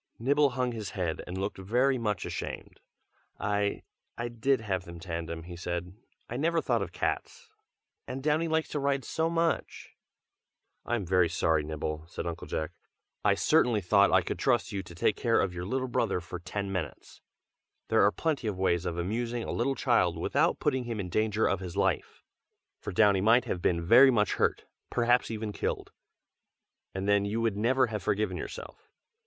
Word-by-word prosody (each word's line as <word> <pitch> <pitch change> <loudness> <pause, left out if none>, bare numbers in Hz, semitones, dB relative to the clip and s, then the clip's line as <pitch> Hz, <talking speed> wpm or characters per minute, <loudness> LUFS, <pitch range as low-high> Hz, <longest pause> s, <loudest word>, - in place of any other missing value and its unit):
Nibble 140 +4 +3
hung 125 -1 +1
his 110 -4 -5
head 85 -4 -1
and 90 - -5
looked 95 +1 -3
very 125 +7 +2
much 105 -3 -1
ashamed. - - -6 0.6
"I 100 0 0 0.3
I 120 0 -3
did 120 +2 +1
have 95 -4 -2
them 85 -1 -10
tandem," 85 -1 -5
he 85 +1 -8
said. 85 +1 -4 0.3
"I 120 - -4
never 165 +4 +2
thought - - +1
of - - -4
cats, 465 -2 -3 0.6
and 130 +1 -5
Downy 155 +2 +2
likes 160 0 0
to 150 - -2
ride 140 -1 0
so 160 0 0
much!" 165 0 -1 1.0
"I 120 - +1
am 105 -5 -2
very 90 -1 +3
sorry, 80 -2 +2
Nibble!" 75 +1 -4
said 85 - -6
Uncle 85 -1 -5
Jack, 80 - -3 0.5
"I 100 -1 +4
certainly 125 -2 +3
thought 100 +2 +4
I 95 -1 +5
could - - -4
trust 120 -3 +1
you 100 -2 -2
to 85 -2 -12
take 95 +3 +2
care 115 -2 +2
of 95 - 0
your 90 0 -5
little 130 +5 -1
brother 115 -6 0
for 90 +1 -7
ten 100 +3 -4
minutes. 90 -6 -5 0.7
There - - +4
are 100 - +5
plenty 145 -2 -1
of 100 -3 -2
ways 90 -2 +1
of 85 -1 -3
amusing 115 +6 -2
a - - -4
little 135 +4 0
child - - +2
without - - +1
putting 130 -4 0
him 115 -2 -4
in 90 -2 -3
danger 110 +3 +1
of 100 - +1
his 90 -2 -7
life; - - 0 0.6
for - - -5
Downy 100 0 +4
might 115 +4 +5
have 90 - -3
been 85 -1 +1
very 125 +8 +8
much 105 -6 +2
hurt, - - 0 0.2
perhaps 120 0 +2
even 110 -1 -3
killed, - - -3 1.0
and 95 +1 -4
then 100 -1 +4
you 105 +3 -1
would 115 -3 +1
never 130 +5 +3
have 110 -3 -4
forgiven 105 +3 0
yourself. - - -8
105 Hz, 185 wpm, -29 LUFS, 90-125 Hz, 1.0 s, very